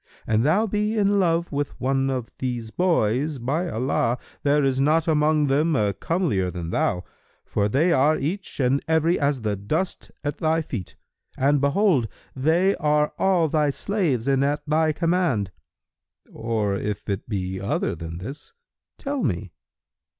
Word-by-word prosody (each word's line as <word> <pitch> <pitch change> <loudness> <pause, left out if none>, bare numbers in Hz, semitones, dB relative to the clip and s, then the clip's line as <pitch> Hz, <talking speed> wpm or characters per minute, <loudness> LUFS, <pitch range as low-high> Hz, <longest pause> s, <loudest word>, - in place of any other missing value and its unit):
An 110 0 +2
thou 165 - +3
be 210 +1 -1
in 200 -1 +3
love 170 -2 +1
with 145 0 -3
one 135 +1 +1
of 125 -3 -3
these 120 -3 -3
boys,[FN#312] 140 - 0
by 160 +7 0
Allah, 120 -1 0 0.2
there 145 0 +2
is 135 -1 +1
not 155 +3 +2
among 155 -1 +3
them 150 +4 +2
a 105 -3 +1
comelier 135 - -1
than 85 -2 -5
thou, 90 0 0 0.4
for 105 0 0
they 160 +10 +3
are 150 +2 +3
each 180 +7 -4
and 135 +1 +2
every 160 +2 +2
as 140 -3 0
the 105 -2 -1
dust 150 - -3
at 145 0 -3
thy 160 0 +1
feet; 105 - -6 0.4
and 140 +1 +2
behold, 140 - +2 0.3
they 165 +8 +2
are 150 0 +1
all 180 -4 +3
thy 150 -1 +1
slaves 145 - -1
and 135 -1 +3
at 145 +1 0
thy 155 +1 +2
command. 165 - 0 0.8
Or 110 -3 -1
if 105 +1 -4
it 100 0 -3
be 95 -3 -3
other 145 - -1
than 80 0 -7
this, 135 - -8 0.4
tell 280 -1 -3
me." 95 - -2
145 Hz, 155 wpm, -24 LUFS, 115-165 Hz, 0.8 s, thou